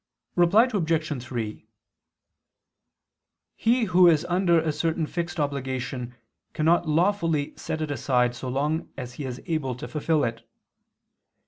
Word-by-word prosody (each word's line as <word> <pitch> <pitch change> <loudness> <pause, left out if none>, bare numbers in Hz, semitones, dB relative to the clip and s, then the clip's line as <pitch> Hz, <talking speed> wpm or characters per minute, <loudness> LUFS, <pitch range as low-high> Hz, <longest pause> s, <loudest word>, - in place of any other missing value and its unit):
Reply 175 +6 +5
Obj. 160 - 0
3: 115 -4 -5 1.9
He 240 +2 +2
who 180 -3 +5
is 160 -3 +4
under 175 -1 +3
a 160 -1 0
certain 160 +2 -1
fixed 170 +2 -4
obligation 130 -3 -3 0.4
cannot 165 +1 +2
lawfully 165 -3 +1
set 160 - -4
it 155 -2 -2
aside 125 -3 +1
so 125 +2 -5
long 150 +5 -1
as 125 -2 -6
he 145 - -6
is 125 -1 -5
able 155 -7 -1
to 125 - -7
fulfil 155 0 0
it. 115 -1 -3
155 Hz, 130 wpm, -25 LUFS, 130-170 Hz, 1.9 s, Reply